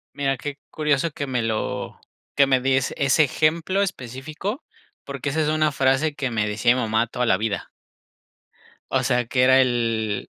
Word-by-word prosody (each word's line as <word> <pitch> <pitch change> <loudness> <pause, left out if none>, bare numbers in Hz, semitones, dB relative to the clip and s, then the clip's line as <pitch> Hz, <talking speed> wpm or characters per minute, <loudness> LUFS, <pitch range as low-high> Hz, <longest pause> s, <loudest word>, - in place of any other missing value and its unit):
Mira, 135 -1 0
qué 145 +3 -6
curioso 150 +1 0
que 145 - -4
me 125 -3 -1
lo 110 -1 -3 0.3
que 140 -1 +5
me 130 -1 +2
des 130 0 +1
ese 140 +2 +3
ejemplo 165 +7 +1
específico, 155 - -5 0.4
porque 140 0 -5
esa 160 - -1
es 150 - 0
una 155 0 +1
frase 140 +3 +1
que 135 -3 -3
me 105 -2 0
decía 110 +4 +2
mi 130 - -1
mamá, 110 +1 +1
toda 125 0 -2
la - - +4
vida. 110 -2 -3 1.2
O 130 - +1
sea, 125 -2 +1
que 125 +1 +1
era 130 +1 +6
el 115 -5 0
130 Hz, 175 wpm, -23 LUFS, 120-150 Hz, 1.2 s, era